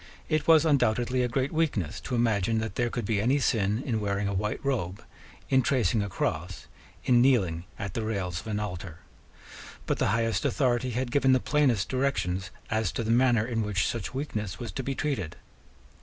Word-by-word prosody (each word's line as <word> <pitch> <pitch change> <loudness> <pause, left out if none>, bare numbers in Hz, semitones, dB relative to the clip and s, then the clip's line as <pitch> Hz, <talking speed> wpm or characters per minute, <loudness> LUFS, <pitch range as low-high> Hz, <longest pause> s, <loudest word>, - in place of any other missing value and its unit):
It 155 -1 0
was 160 -1 +6
undoubtedly 125 -3 +2
a 125 - +2
great 130 +3 -1
weakness 140 - -1
to 125 - -3
imagine 110 -2 +1
that 110 0 -2
there 120 -1 0
could 120 0 -3
be 105 -3 +1
any 130 +6 +3
sin 110 -3 +1
in 115 -6 0
wearing 100 0 -1
a 100 - -1
white 105 +3 -1
robe, 100 -9 -2 0.4
in 130 -1 +4
tracing 120 -4 +1
a 100 - -3
cross, 85 +1 -3 0.4
in 120 -2 +5
kneeling 95 -11 +2
at 100 -3 -5
the 115 - -2
rails 95 -6 -2
of 110 - -10
an 105 -1 -1
altar. 90 -4 -6 0.8
But - - -1
the - - +2
highest 115 +1 +1
authority 125 -2 +1
had 125 +1 -2
given 135 -1 +4
the 130 - +4
plainest 130 -8 +2
directions 130 -9 -1 0.2
as 110 -4 +1
to 115 - -2
the 110 - -1
manner 120 -2 +4
in 115 -2 -1
which 105 -3 0
such 115 -4 -3
weakness 110 -8 -4
was 120 - -6
to 135 - -4
be 135 +1 -3
treated. 125 - -2
115 Hz, 195 wpm, -28 LUFS, 100-130 Hz, 0.8 s, was